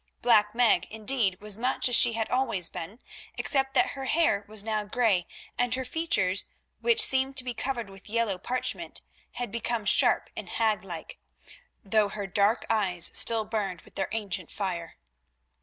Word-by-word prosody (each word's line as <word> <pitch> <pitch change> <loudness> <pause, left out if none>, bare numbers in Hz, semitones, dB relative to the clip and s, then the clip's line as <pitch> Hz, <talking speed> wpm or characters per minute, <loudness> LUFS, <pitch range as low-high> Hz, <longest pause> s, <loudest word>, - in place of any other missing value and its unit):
Black 215 -3 +3
Meg, 240 -2 +3
indeed, 215 -3 0
was 210 0 +1
much 255 +2 +2
as 245 - +3
she 235 0 +7
had 225 -1 -2
always 230 -9 +1
been, 190 +7 -8 0.4
except 270 -2 -1
that - - +3
her 270 -1 -7
hair 265 -9 +1
was 215 -1 -3
now 215 -1 -2
grey 205 -5 0 0.3
and 245 -1 +1
her 260 0 -4
features, 210 - 0 0.3
which 470 -1 +2
seemed 270 -9 +5
to 260 - +1
be 250 -1 -4
covered 240 -2 -4
with 195 +1 -15
yellow 220 -4 -1
parchment, 250 +6 -3 0.3
had 245 -4 -5
become 230 -1 -3
sharp 205 - +3
and - - -7
haglike, 195 -7 -3 0.6
though 210 0 +2
her 205 0 -5
dark 200 +4 +1
eyes 185 -6 +2
still 225 -2 +4
burned 200 -6 -3
with - - -20
their 195 - -3
ancient 195 -6 -3
fire. 175 -5 -5
220 Hz, 165 wpm, -27 LUFS, 195-245 Hz, 0.6 s, she